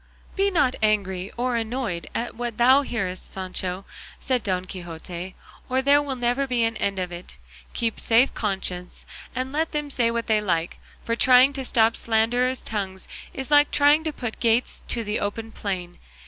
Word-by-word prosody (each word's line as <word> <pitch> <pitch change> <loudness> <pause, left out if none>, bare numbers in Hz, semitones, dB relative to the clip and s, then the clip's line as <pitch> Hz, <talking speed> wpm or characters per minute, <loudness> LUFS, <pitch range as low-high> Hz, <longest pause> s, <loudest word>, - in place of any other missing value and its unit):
"Be 395 +1 +2
not 285 -9 +2
angry 195 -3 0
or 245 0 0
annoyed 225 -6 -3
at 240 - -2
what 240 -1 -4
thou 260 +4 +6
hearest, 195 -9 -4
Sancho," 185 0 -4 0.3
said 255 -2 0
Don 185 -2 -1
Quixote, 175 0 -7 0.3
"or 260 +1 +1
there 285 +1 +5
will 280 -2 -3
never 245 +3 0
be 245 -2 +1
an 225 0 0
end 200 -2 -1
of 180 -1 -2
it; 175 +1 -9 0.4
keep 230 -2 -1
a - - -4
safe 235 +4 +4
conscience 190 -4 -3 0.3
and 255 +1 -2
let 315 +3 -1
them 295 -1 -2
say 235 -3 +2
what 230 0 -2
they 215 -1 +2
like; 170 -4 -1 0.3
for 230 - 0
trying 255 +2 +6
to 270 -1 -3
stop 225 -2 +3
slanderers' 245 +3 +1
tongues 190 -3 -4 0.2
is 265 +2 -6
like 290 0 +6
trying 290 +2 +4
to 315 - -1
put 240 -6 -6
gates 235 +1 +1
to 235 - -1
the 210 0 -2
open 225 +2 -4
plain. 180 -5 -4
230 Hz, 180 wpm, -24 LUFS, 190-255 Hz, 0.4 s, thou